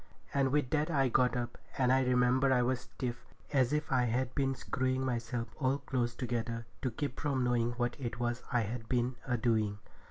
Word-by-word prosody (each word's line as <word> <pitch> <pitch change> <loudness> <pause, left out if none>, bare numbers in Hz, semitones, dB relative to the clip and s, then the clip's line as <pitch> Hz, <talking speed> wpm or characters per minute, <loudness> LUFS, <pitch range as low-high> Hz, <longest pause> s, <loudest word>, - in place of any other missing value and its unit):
And 135 -1 +3
with 145 -3 +1
that 155 +1 +1
I 135 -5 +3
got 125 +1 +3
up, 120 0 -4 0.2
and 130 -1 +4
I 130 - +4
remember 125 +1 +3
I 125 -1 +4
was 125 0 +1
stiff, 120 -1 -5 0.3
as 130 -2 +3
if 150 0 -1
I 125 -2 +3
had 125 +2 0
been 135 -2 +1
screwing 130 +1 -1
myself 120 -1 -2
all 135 -1 +2
close 120 -4 -1
together 115 -2 -2 0.2
to 130 - 0
keep 130 +3 -4
from 140 -4 0
knowing 120 -1 +1
what 120 0 -1
it 120 -2 -4
was 120 0 -1
I 120 - +3
had 115 +1 -4
been 125 0 +1
a 125 -1 +1
doing. 110 -3 +1
125 Hz, 200 wpm, -33 LUFS, 120-130 Hz, 0.3 s, and